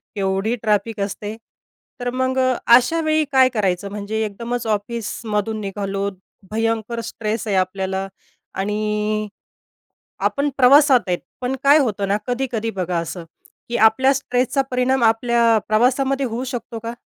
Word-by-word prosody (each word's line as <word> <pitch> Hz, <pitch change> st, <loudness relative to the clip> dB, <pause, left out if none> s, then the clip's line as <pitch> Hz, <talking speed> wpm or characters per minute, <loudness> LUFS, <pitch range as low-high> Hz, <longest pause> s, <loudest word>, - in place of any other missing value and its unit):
केवढी 195 Hz, +3 st, 0 dB
ट्रॅफिक 215 Hz, 0 st, 0 dB
असते. 205 Hz, +2 st, -4 dB, 0.6 s
तर 245 Hz, 0 st, -2 dB
मग 260 Hz, +1 st, -1 dB, 0.3 s
अशावेळी 310 Hz, +6 st, +4 dB
काय 260 Hz, -1 st, +5 dB
करायचं? 200 Hz, -5 st, -1 dB
म्हणजे 210 Hz, +2 st, -4 dB
एकदमच 235 Hz, +3 st, -4 dB
ऑफिसमधून 215 Hz, 0 st, -2 dB
निघालो 200 Hz, 0 st, -3 dB, 0.4 s
भयंकर 225 Hz, +1 st, -1 dB
स्ट्रेस 220 Hz, 0 st, -4 dB
आहे 200 Hz, -, 0 dB
आपल्याला 190 Hz, +1 st, -1 dB, 0.5 s
आणि 210 Hz, +1 st, -1 dB, 1.0 s
आपण 280 Hz, +1 st, -1 dB
प्रवासात 270 Hz, 0 st, +6 dB
आहेत. 180 Hz, -1 st, 0 dB, 0.2 s
पण 255 Hz, +1 st, -2 dB
काय 285 Hz, +2 st, +7 dB
होतं 210 Hz, -8 st, 0 dB
ना 200 Hz, -, +2 dB
कधी-कधी 245 Hz, -3 st, -2 dB
बघा 180 Hz, -4 st, -2 dB
असं 170 Hz, +1 st, -5 dB, 0.4 s
की 235 Hz, -, -1 dB
आपल्या 240 Hz, +5 st, +4 dB
स्ट्रेसचा 260 Hz, 0 st, 0 dB
परिणाम 255 Hz, 0 st, +1 dB
आपल्या 230 Hz, 0 st, +3 dB
प्रवासामध्ये 265 Hz, +5 st, +2 dB
होऊ 240 Hz, +2 st, -3 dB
शकतो 245 Hz, -3 st, -5 dB
का? 230 Hz, +1 st, -5 dB
225 Hz, 125 wpm, -21 LUFS, 205-250 Hz, 1.0 s, काय